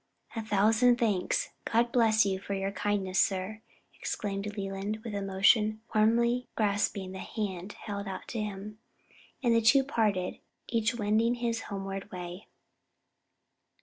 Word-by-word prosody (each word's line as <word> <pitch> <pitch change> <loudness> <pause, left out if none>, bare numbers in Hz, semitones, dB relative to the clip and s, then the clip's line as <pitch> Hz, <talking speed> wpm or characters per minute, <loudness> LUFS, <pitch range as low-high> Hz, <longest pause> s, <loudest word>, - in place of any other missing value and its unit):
"A 225 - -1
thousand 220 +4 +4
thanks! 210 -6 +1
God 235 +1 +2
bless 220 -3 +4
you 190 -1 0
for 200 +1 -4
your 195 0 -1
kindness, 195 -1 +1
sir!" 195 +3 -1 0.3
exclaimed 200 0 -3
Leland, 195 +2 -3
with 230 -3 -5
emotion, 200 +2 +3
warmly 235 +3 +3
grasping 205 -2 0
the 190 - -7
hand 195 -2 -4
held 200 -1 -6
out 190 -1 -6
to 225 - -2
him; 210 +1 -6 0.6
and 240 -2 +4
the 230 - +4
two 260 +5 +6
parted, 210 -9 0 0.3
each 230 +1 +1
wending 220 +2 +2
his 235 -1 -1
homeward 195 -1 -5
way. 180 +1 -7
210 Hz, 135 wpm, -30 LUFS, 195-225 Hz, 0.6 s, two